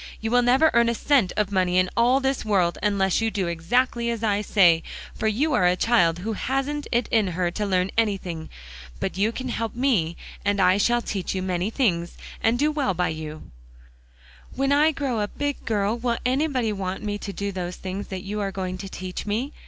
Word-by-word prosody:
"You 225 0 -3
will 245 0 +5
never 260 +6 +4
earn 235 0 +4
a 235 - 0
cent 255 -7 +2
of 210 -2 0
money 185 -2 +1
in 185 0 +4
all 250 +3 +4
this 270 0 -1
world, 190 -6 +1
unless 200 -1 +1
you 225 - +1
do 200 -4 -2
exactly 235 +8 0
as 230 -1 -3
I 205 -2 +1
say; 175 -6 +4 0.3
for 220 - -2
you 275 +8 +1
are 180 -8 +4
a 180 - +3
child 180 -6 +3
who 215 +5 -3
hasn't 270 +6 -2
it 240 -1 +1
in 220 -3 +2
her 175 0 -1
to 210 +3 -2
learn 185 -1 +1
anything. 185 -7 -2 0.5
But - - -3
you 205 +4 +1
can 255 +2 -5
help 230 -2 -3
me, 225 -11 +1 0.3
and 205 0 +1
I 185 +1 +4
shall 240 +3 +2
teach 195 -2 -3
you 185 - -2
many 185 +1 -1
things, 180 -9 0 0.2
and 225 +2 +2
do 300 +4 +2
well 280 -11 0
by 180 +1 0
you." 155 - -7 1.0
"When 275 +1 +1
I 300 +3 +5
grow 275 -6 -2
a 205 - 0
big 285 +5 -4
girl, 210 -1 0
will 235 -1 0
anybody 255 -4 +1
want 190 0 -4
me 205 -1 -3
to 200 - -5
do 200 +1 -3
those 180 -2 -4
things 190 +2 -5
that 190 -1 -6
you 210 +1 -4
are 200 -1 -2
going 185 -1 -4
to 195 0 -6
teach 185 +2 -6
me?" 235 +8 -2
210 Hz, 215 wpm, -24 LUFS, 185-240 Hz, 1.0 s, will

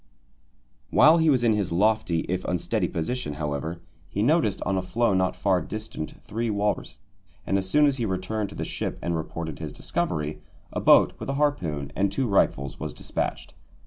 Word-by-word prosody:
While 160 +2 +6
he 160 -1 +4
was 130 -4 +3
in 115 -2 +4
his 105 -5 -1
lofty 90 -2 +2
if 90 +1 -3
unsteady 90 -2 0
position, 85 -1 -3
however, 75 +3 -3 0.3
he 100 - -1
noticed 130 - +2
on 95 - 0
a 95 - +1
floe 115 +4 +1
not 95 0 +1
far 95 -3 +2
distant 105 -4 -6
three 115 +2 -2
walrus, 105 0 -1 0.4
and 95 - 0
as 95 -1 0
soon 150 +8 +5
as 140 -2 +2
he 120 - -1
returned 95 +2 -2
to - - -10
the - - -3
ship - - -4
and 85 - 0
reported 80 -1 -5
his - - -5
discovery, 75 0 -2 0.3
a - - -1
boat - - +6
with - - -5
a 135 - -1
harpoon 85 - 0
and 100 0 +1
two 130 +6 0
rifles 70 - +1
was - - -5
despatched. - - -3
95 Hz, 185 wpm, -26 LUFS, 85-115 Hz, 0.4 s, While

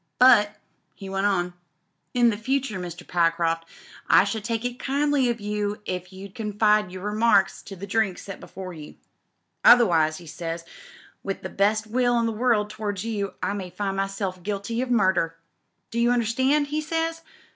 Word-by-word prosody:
^Bvi* 235 -5 +7 0.5
he 195 - -9
went 195 +1 +1
on, 180 -3 0 0.6
'in 240 -3 +4
future, 250 -1 -1
Mr. 175 -1 -7
Pyecroft, 165 -1 +1 0.4
I - - +7
should 205 +1 -3
take 230 +1 -2
it 245 0 -3
kindly 280 -1 +1
of 235 -1 -1
you 210 0 -2
if 180 0 -4
you'd 190 +1 -10
confine 210 -1 +2
your 185 +1 -8
remarks 210 -1 +2
to 195 - -10
the 190 +2 -7
drinks 200 -2 0
set 195 - -8
before 185 -1 -8
you. 155 -2 -10 0.7
Otherwise,' 165 -10 +6
he 175 - -12
says, 165 +1 -5 0.6
*with 195 -1 -5
the - - -4
best 215 +2 +1
will 245 +1 +2
in 230 - +1
the 225 - 0
world 220 -2 +1
towards 210 -2 -4
you, 205 -3 -3
I - - 0
may 190 -3 -5
find 195 +1 -3
myself 195 -1 -3
guilty 205 +4 -3
of 260 - -3
murderl 190 -8 +2 0.6
Do 235 - -2
you 235 +1 +3
understand?' 260 +5 +2
he 305 +1 -1
says. 325 +1 -2
210 Hz, 170 wpm, -25 LUFS, 190-235 Hz, 0.7 s, ^Bvi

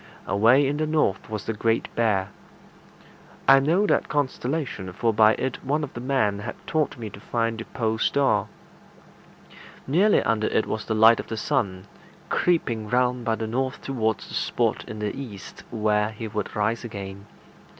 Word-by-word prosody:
Away 115 +8 +4
in 145 +2 -1
the 155 0 0
north 150 -13 0
was 110 -3 -4
the 115 - -2
Great 115 +1 0
Bear. 100 -5 +1 1.2
I 135 0 +8
knew 165 +9 +2
that - - +1
constellation, 135 - -2
for 115 +4 +1
by 110 +1 +6
it 130 -1 -3
one 150 +3 0
of 145 - -6
the - - -6
men 125 -6 +1
had 105 - -5
taught 155 -3 0
me 110 -3 -6
to 100 - -11
find 115 +1 -2
the 115 - -6
pole 110 -2 -2
star. 110 -8 +2 1.4
Nearly 185 +10 +3
under 110 -1 +1
it - - +1
was 110 -1 -4
the 110 - -1
light 110 +2 +6
of - - -5
the 110 - -4
sun, 100 -7 -1 0.4
creeping 115 -11 0
round 125 0 +1
by 115 -2 +1
the 110 +1 -4
north 130 +4 -2
towards 110 -5 -1
the - - -11
spot - - 0
in 110 - -6
the 105 -1 -3
east 105 -9 -9
where 105 -1 +1
he 110 +1 -6
would 105 -1 -4
rise 110 +3 0
again. 100 -3 -7
115 Hz, 175 wpm, -25 LUFS, 105-135 Hz, 1.4 s, I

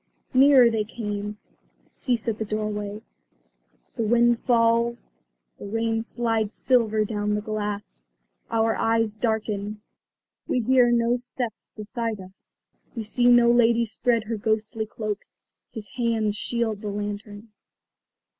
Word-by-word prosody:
Nearer 260 -2 +7
they 220 -1 0
come; 210 -1 -5 0.5
cease 240 -3 -1
at 225 -1 -1
the - - 0
doorway. 210 0 -4 0.9
The 230 - 0
wind 240 +1 +4
falls, 235 0 +1 0.5
the - - -7
rain 225 +1 0
slides 225 -2 -1
silver 220 -4 +2
down 210 -1 -1
the 210 - -1
glass. 210 -1 -4 0.4
Our 225 -1 +1
eyes 225 -1 +1
darken; 215 -2 -2 0.7
we - - +1
hear 250 +1 +4
no 240 0 +2
steps 245 -2 -6
beside 225 0 -4
us; 190 +1 -16 0.4
we 230 - -3
see 240 +3 0
no 240 -1 +6
lady 235 -1 +4
spread 230 +1 0
her 225 +1 -3
ghostly 220 +1 -1
cloak. 215 -1 -4 0.5
His 220 -3 -7
hands 230 -5 0
shield 220 -1 -2
the 210 - -4
lantern. 205 +1 -6
225 Hz, 125 wpm, -25 LUFS, 210-235 Hz, 0.9 s, Nearer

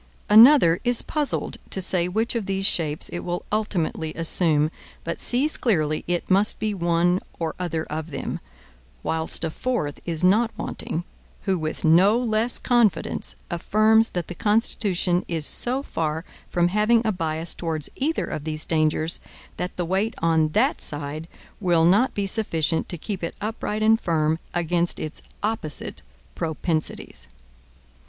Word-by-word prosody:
Another 220 - +8
is 245 -1 +3
puzzled 300 -2 -1
to - - -1
say 180 -1 +3
which 220 +6 0
of 230 -5 -3
these 195 0 -1
shapes 155 -6 +1
it 175 - -4
will 175 0 -4
ultimately 175 -7 -1
assume, 160 -2 +3 0.3
but 170 - -4
sees 275 +6 +2
clearly 155 -10 0
it 175 +1 -2
must 200 +3 +3
be 215 -1 -1
one 175 0 +2 0.2
or 165 -2 -2
other 165 -3 -2
of 160 +1 -5
them; 140 -3 -4 0.6
whilst 160 +1 -1
a 165 - -1
fourth 200 - -2
is 165 -1 -2
not 215 +6 +4
wanting, 170 - -4 0.4
who 190 - +1
with 155 -2 -3
no 185 +7 +5
less 230 -1 0
confidence 240 -5 +1 0.2
affirms 215 +6 +3
that 175 -3 -4
the - - -6
Constitution 195 -3 +1
is 165 -3 -2
so 255 - -2
far 160 - -3 0.2
from 175 0 +2
having 215 +4 +3
a 220 - +2
bias 165 -2 -2
towards 160 -3 -2
either 305 +4 -1
of 150 - -5
these 155 0 -3
dangers, 155 0 0 0.4
that 180 - -4
the 175 - -1
weight 195 +6 0
on 160 -1 +3
that 260 +7 +2
side 150 +2 -5 0.3
will 175 -4 +3
not 205 +9 +3
be 200 - -1
sufficient 170 -6 0
to 175 - -1
keep 190 +2 -5
it 165 - -3
upright 215 0 -3
and 225 +1 +4
firm 160 -1 +1 0.2
against 175 0 0
its 155 0 -5 0.2
opposite 210 -9 -2 0.3
propensities. 160 - -3
175 Hz, 150 wpm, -24 LUFS, 160-215 Hz, 0.6 s, Another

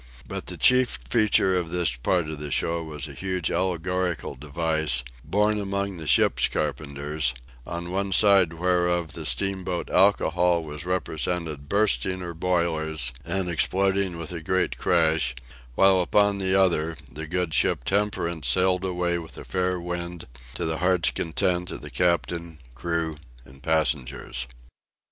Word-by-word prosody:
But - - -6
the - - -4
chief 125 - +5
feature 95 - +3
of 90 -2 -1
this 85 -7 0
part 80 +7 0
of 75 -1 -6
the 75 0 -4
show 85 +4 0
was 75 -3 -4
a - - -9
huge 95 -3 -2
allegorical 90 0 -1
device, 75 -2 -1 0.2
borne 105 +1 +1
among 100 -1 -2
the 80 -2 -6
ship - - +4
carpenters, 75 -2 -2 0.3
on 85 +1 -5
one 100 +1 -1
side 95 -4 +5
whereof 90 -1 0
the 80 -2 -3
steamboat 95 -2 -1
Alcohol 90 -3 +3
was 75 +2 -7
represented 80 -4 -2
bursting 100 -2 +1
her 90 -2 -6
boiler 85 -2 -1 0.3
and 95 +2 -1
exploding 95 +1 +1
with 85 -1 -6
a 85 -2 -5
great 95 +3 0
crash, 80 -7 +2 0.4
while 95 +2 +5
upon 100 +2 +2
the 95 0 +1
other, 85 -4 +1
the 75 +1 -7
good 90 -1 -2
ship - - +2
Temperance 85 -5 -1
sailed 90 +7 +2
away 90 -2 -1
with 80 -1 -10
a - - -8
fair 90 -1 -1
wind, 85 0 -5 0.3
to - - -2
the 80 0 -2
heart's 90 -1 +2
content 90 +2 0
of - - -6
the 75 -1 -9
captain, 85 +2 0 0.2
crew, 80 +3 -2 0.3
and 65 +1 -16
passengers. 70 -6 0
85 Hz, 150 wpm, -25 LUFS, 80-95 Hz, 0.4 s, chief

